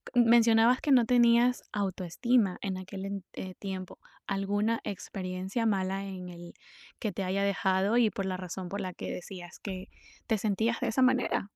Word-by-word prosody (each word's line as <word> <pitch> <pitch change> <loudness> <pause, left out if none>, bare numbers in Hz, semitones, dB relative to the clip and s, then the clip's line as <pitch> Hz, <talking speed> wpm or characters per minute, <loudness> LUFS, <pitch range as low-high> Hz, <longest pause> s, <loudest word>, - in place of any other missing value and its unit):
mencionabas 235 0 +5
que 295 - 0
no 245 -3 +6
tenías 240 +1 +4
autoestima 200 +2 0
en 190 -2 -2
aquel 190 +1 -7
ent 195 -2 -5 0.3
tiempo, 190 -2 -6 0.3
alguna 205 +3 0
experiencia 190 +3 -4
mala 195 -1 0
en 180 -2 -7
el 175 0 -10 0.5
que 215 -4 -2
te 195 +2 -3
haya 195 +2 0
dejado 195 +2 +2
y 230 -3 +5
por 195 -2 -4
la 185 -1 -2
razón 185 0 -6
por 200 0 -4
la 185 -1 -4
que - - -6
decías 180 -1 -8
que 190 -1 -6 0.4
te 220 -3 +2
sentías 220 +3 0
de - - -1
esa 260 +4 +1
manera. 255 -5 +2
200 Hz, 165 wpm, -30 LUFS, 185-230 Hz, 0.5 s, no